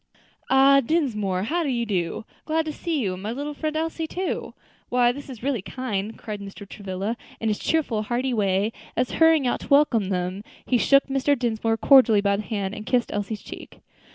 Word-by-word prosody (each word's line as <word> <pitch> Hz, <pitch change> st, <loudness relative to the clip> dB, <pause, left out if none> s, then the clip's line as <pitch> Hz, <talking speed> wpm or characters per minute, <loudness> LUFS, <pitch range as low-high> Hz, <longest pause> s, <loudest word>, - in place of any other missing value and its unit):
"Ah! 270 Hz, +1 st, +6 dB
Dinsmore, 225 Hz, -, 0 dB
how 335 Hz, +11 st, 0 dB
do 305 Hz, -, -1 dB
you 240 Hz, -2 st, 0 dB
do? 185 Hz, -1 st, -2 dB, 0.2 s
Glad 320 Hz, 0 st, 0 dB
to 310 Hz, -, -4 dB
see 330 Hz, -2 st, -2 dB
you, 190 Hz, -5 st, -1 dB
and 185 Hz, -, -8 dB
my 210 Hz, +3 st, -3 dB
little 290 Hz, +4 st, -4 dB
friend 310 Hz, +1 st, -3 dB
Elsie, 325 Hz, 0 st, -2 dB
too. 370 Hz, +3 st, -4 dB, 0.3 s
Why 245 Hz, -1 st, +3 dB
this 280 Hz, +3 st, -9 dB
is 240 Hz, -4 st, -9 dB
really 265 Hz, -6 st, 0 dB
kind," 215 Hz, -2 st, -4 dB
cried 210 Hz, -2 st, -6 dB
Mr. 200 Hz, 0 st, -9 dB
Travilla, 200 Hz, +2 st, -4 dB, 0.2 s
in 225 Hz, -, -1 dB
his 210 Hz, -, -1 dB
cheerful, 280 Hz, -9 st, 0 dB
hearty 245 Hz, +4 st, -1 dB
way, 200 Hz, -1 st, +1 dB, 0.3 s
as, 250 Hz, 0 st, +1 dB
hurrying 320 Hz, -3 st, +4 dB
out 245 Hz, -, 0 dB
to -, -, -10 dB
welcome 280 Hz, -9 st, +3 dB
them, 185 Hz, +1 st, -2 dB, 0.2 s
he 245 Hz, -, +2 dB
shook 275 Hz, +3 st, +4 dB
Mr. 275 Hz, +1 st, +1 dB
Dinsmore 225 Hz, -2 st, 0 dB
cordially 250 Hz, -5 st, +6 dB
by 200 Hz, 0 st, +2 dB
the -, -, -2 dB
hand, 200 Hz, -3 st, -3 dB
and 215 Hz, 0 st, -8 dB
kissed 245 Hz, -2 st, +1 dB
Elsie's 205 Hz, +1 st, -3 dB
cheek. -, -, -11 dB
235 Hz, 200 wpm, -24 LUFS, 205-280 Hz, 0.3 s, Ah